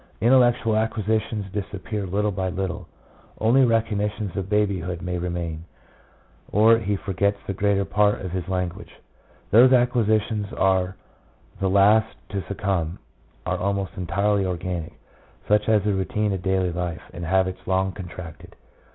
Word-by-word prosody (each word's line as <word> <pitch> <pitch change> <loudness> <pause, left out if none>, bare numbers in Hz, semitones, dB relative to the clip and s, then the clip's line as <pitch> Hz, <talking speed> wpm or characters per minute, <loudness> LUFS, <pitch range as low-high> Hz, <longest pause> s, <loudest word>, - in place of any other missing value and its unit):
Intellectual 120 -2 +4
acquisitions 110 -1 -1
disappear 100 0 -4
little 105 +3 0
by 95 -1 -2
little. 95 0 -4 0.5
Only 120 +5 +4
recollections 105 -4 0
of 95 -1 -3
baby 105 -2 +1
hood 85 +1 -5
may 90 -1 -2
remain, 85 -2 -4 0.9
or 110 +2 +5
he 105 -2 -1
forgets 100 +1 0
the 100 - -3
greater 100 0 +1
part 105 +1 +2
of 95 - -5
his 90 -1 -4
language. 90 -2 -3 0.6
2 120 +5 +8
Those 130 - +3
acquisitions 110 -4 +2
which - - -9
are 95 -1 +2 0.6
the 95 - +1
last 105 +3 +4
to 100 -1 -3
succumb 95 -4 -2 0.5
are - - -1
almost 100 -2 -1
entirely 100 +3 0
organic, 90 -2 -3 0.5
such 105 +1 +2
as 105 -3 +4
the 105 -1 +1
routine 105 +1 -1
of 95 - -3
daily 95 -1 +1
life, 85 -1 -4
and 85 - -7
habits 95 +2 +1
long 95 0 +1
contracted. 90 -2 -10
100 Hz, 145 wpm, -24 LUFS, 90-105 Hz, 0.9 s, 2